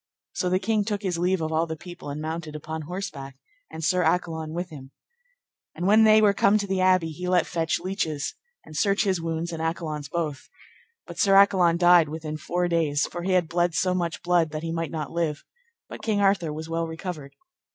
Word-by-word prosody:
So 180 - -1
the 185 - +2
king 210 +2 0
took 205 0 -3
his 180 -3 -1
leave 180 0 +1
of 160 0 -2
all 160 +1 +1
the 160 - -4
people, 175 -1 -10
and 145 +1 -5
mounted 155 0 -5
upon 155 +1 -5
horseback, 150 -6 -6 0.3
and 160 - -8
Sir 180 +1 +2
Accolon 160 -2 0
with 175 +2 -4
him. 135 -3 -10 0.9
And 175 - -3
when 215 +3 +6
they 215 0 +6
were 205 -1 +5
come 200 +1 +4
to 205 - -2
the 190 -1 -1
abbey, 185 -3 +3
he 180 +4 -6
let 180 -2 +3
fetch 165 -2 -1
leeches 170 -5 -2 0.3
and 155 - -12
search 200 +6 +2
his 190 -4 0
wounds 165 +1 -3
and 165 -1 -5
Accolon's 155 -3 -3
both; 155 -3 -3 0.6
but - - -10
Sir 195 -2 +4
Accolon 185 -4 +5
died 175 -3 +5
within 155 0 -5
four 175 +3 -1
days, 155 -4 +1
for 175 - -6
he 185 +2 0
had 180 -3 +2
bled 175 0 0
so 185 +2 +1
much 170 -2 -2
blood 175 -2 +2
that 155 +1 -5
he 165 - -3
might 165 -1 -2
not 150 -4 -5
live, 165 -4 -2 0.4
but - - -9
King 215 -3 0
Arthur 195 -5 +2
was 155 +1 -6
well 165 0 -2
recovered. 160 -3 -7
170 Hz, 215 wpm, -25 LUFS, 160-185 Hz, 0.9 s, when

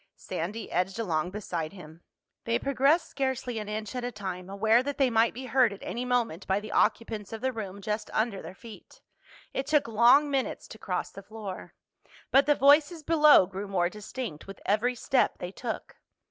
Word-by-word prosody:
Sandy 205 +8 -5
edged 185 +3 0
along 175 -7 -1
beside 180 -5 -4
him. 165 -3 -12 0.4
They 230 0 +1
progressed 275 +6 +2
scarcely 260 -3 -2
an 210 -1 -6
inch 215 0 -4
at 250 - -3
a 245 - -2
time, 190 -4 -6
aware 220 +4 +3
that 285 +2 -4
they 265 -3 +3
might 225 +1 +4
be 260 +2 -8
heard 250 -2 +3
at 200 - -10
any 245 +2 -4
moment 235 -8 -1
by 190 +1 +2
the 210 0 -8
occupants 220 -3 0
of 225 - -6
the 260 0 0
room 200 -3 -6
just 210 +1 -3
under 220 -3 -1
their 185 - -9
feet. 225 -1 -14 0.5
It 270 - -3
took 300 -4 +3
long 240 +6 +5
minutes 270 -2 -2
to 220 - -11
cross 185 - -3
the 195 - -10
floor. 205 -2 -8 0.6
But 275 +1 +5
the 295 - +5
voices 295 +4 +4
below 300 - +6
grew 195 +2 -6
more 180 -3 +1
distinct 210 - -7
with 195 - -9
every 235 +5 +1
step 255 +2 +1
they 180 - -6
took. 225 +3 -6
220 Hz, 190 wpm, -28 LUFS, 195-255 Hz, 0.6 s, below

